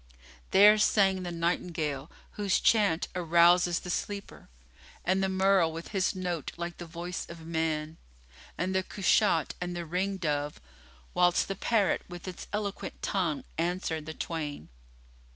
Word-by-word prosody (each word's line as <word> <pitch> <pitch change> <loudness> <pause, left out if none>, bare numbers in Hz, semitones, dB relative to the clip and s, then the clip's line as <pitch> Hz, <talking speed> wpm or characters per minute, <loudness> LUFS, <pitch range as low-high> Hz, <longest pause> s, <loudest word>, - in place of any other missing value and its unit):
There 210 +2 +7
sang 195 -3 +3
the 175 -1 -4
nightingale, 165 -4 -2 0.2
whose 205 -2 +1
chant 200 -7 +3
arouses 175 0 +4
the 180 - -5
sleeper, 200 +2 -5 0.6
and 190 +1 +2
the 190 - +1
merle 190 -3 +3
with 165 +1 -7
his 190 -2 0
note 175 -4 -3
like 170 0 -5
the 175 - -7
voice 175 +2 -5
of 170 -1 -10
man 160 -1 -2 0.6
and 185 +2 -1
the 190 - +2
cushat 180 -4 +2
and 175 0 -3
the 170 -1 -4
ring 190 +4 -1
dove, 150 -4 -2 0.5
whilst 175 0 +3
the 195 - -3
parrot 210 0 +1
with 175 +1 -9
its 180 - -7
eloquent 205 -1 -4
tongue 170 -7 -1 0.2
answered 165 -2 -2
the 160 - -6
twain. 150 - -5
175 Hz, 145 wpm, -29 LUFS, 165-190 Hz, 0.6 s, There